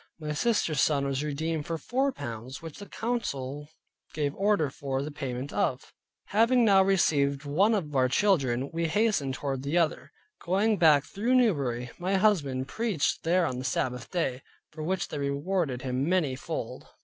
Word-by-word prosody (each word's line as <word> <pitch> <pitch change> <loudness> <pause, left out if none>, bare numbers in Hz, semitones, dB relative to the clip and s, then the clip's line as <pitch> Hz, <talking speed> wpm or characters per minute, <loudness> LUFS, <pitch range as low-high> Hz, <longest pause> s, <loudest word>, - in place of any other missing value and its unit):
My 150 -1 -3
sister's 165 -4 +1
son 140 -2 +2
was 140 +1 -1
redeemed 150 +1 -2
for 165 - -2
four 265 - 0
pounds, 120 - -7
which 165 0 -9
the 205 - -9
council 145 - -3 0.5
gave 145 -2 -1
order 195 -7 +1
for 135 -1 -3
the 150 - -5
payment 135 -1 -5
of. 130 - -1 0.4
Having 230 +4 +4
now 195 -3 +6
received 145 -7 +2
one 195 +10 +3
of 150 -8 -3
our 130 -1 +3
children, 135 - +1
we 165 0 0
hastened 160 -7 +1
toward 135 -2 -3
the 140 +5 -1
other. 165 -3 0 0.3
Going 205 +4 +2
back 150 -5 +5
through 230 +10 0
Newbury 135 - +1
my 185 +2 0
husband 150 -11 +2
preached 215 - -1
there 175 +2 +2
on 125 -4 -3
the - - -5
Sabbath 125 -2 -2
day; 135 -7 -1 0.3
for 155 - -8
which 185 +4 -2
they 150 - -4
rewarded 140 -1 -1
him 130 +3 -1
many 165 -8 +1
fold. 130 - -6
150 Hz, 170 wpm, -28 LUFS, 135-190 Hz, 0.5 s, now